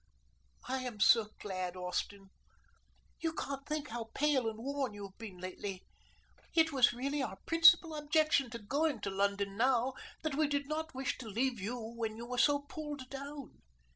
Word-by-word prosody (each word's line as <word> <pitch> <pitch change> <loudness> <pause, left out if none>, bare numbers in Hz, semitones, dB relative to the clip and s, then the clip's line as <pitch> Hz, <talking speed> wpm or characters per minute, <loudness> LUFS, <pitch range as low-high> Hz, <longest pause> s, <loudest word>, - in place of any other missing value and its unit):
"I 265 +1 -1
am 250 -4 -5
so 215 0 +6
glad, 185 -2 -3
Austin. 190 +2 -3 0.9
You 325 -1 -1
can't 275 -3 -4
think 300 -1 -2
how 230 0 -4
pale 275 -5 +2
and 220 - -8
worn 270 -1 -2
you 205 - -7
have 195 -1 -13
been 210 -5 -8
lately. 185 +1 -5 0.7
It 320 -1 +5
was 265 -4 +5
really 275 +4 -2
our 195 -7 -3
principal 330 0 +7
objection 300 -3 +2
to 235 - -5
going 275 +3 0
to 195 - -2
London 200 0 0
now 255 +1 +3 0.3
that 315 -2 -1
we 305 +2 +2
did 285 0 0
not 315 -1 -3
wish 265 0 -2
to 235 -4 -7
leave 240 +3 0
you 220 +6 -3
when 225 -1 -4
you 235 - -6
were 250 0 -3
so 285 +2 +4
pulled 290 -4 -7
down. 280 0 -8
255 Hz, 175 wpm, -34 LUFS, 215-290 Hz, 0.9 s, principal